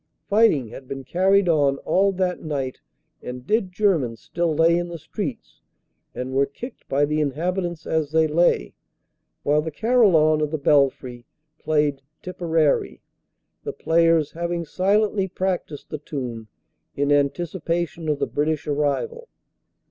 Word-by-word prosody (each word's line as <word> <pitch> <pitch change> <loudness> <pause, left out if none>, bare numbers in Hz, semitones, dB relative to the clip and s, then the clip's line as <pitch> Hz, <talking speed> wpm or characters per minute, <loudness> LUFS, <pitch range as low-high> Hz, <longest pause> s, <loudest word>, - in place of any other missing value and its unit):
Fighting 200 - +3
had 130 +3 -11
been 135 0 -6
carried 190 +7 +2
on 145 -4 +3
all 195 +2 +3
that 180 -1 -1
night 140 -5 -4 0.4
and 125 0 -7
dead 210 -1 0
Germans 170 - +1
still 170 -1 -2
lay 165 +2 +4
in 175 0 -1
the 170 -1 -6
streets 160 - -6 0.5
and 130 +1 -4
were 140 +1 +2
kicked 240 - -10
by 140 +2 +2
the 150 +1 0
inhabitants 170 +4 -2
as 160 -2 0
they 160 0 +4
lay, 155 - +2 0.7
while 150 +1 +3
the 160 - -4
carillon 160 -5 +3
of 150 - 0
the 155 - -2
belfry 135 -4 +1 0.3
played 150 -3 0 0.2
"Tipperary" 165 -4 0 0.6
the - - -4
players 165 -2 +2
having 170 0 -3
silently 200 +3 +1
practised 185 -5 -3
the 155 - -4
tune 125 -7 -6 0.5
in 145 +1 0
anticipation 165 +2 -1
of 150 - +1
the - - 0
British 150 0 -1
arrival. 150 - -1
160 Hz, 140 wpm, -23 LUFS, 145-180 Hz, 0.7 s, lay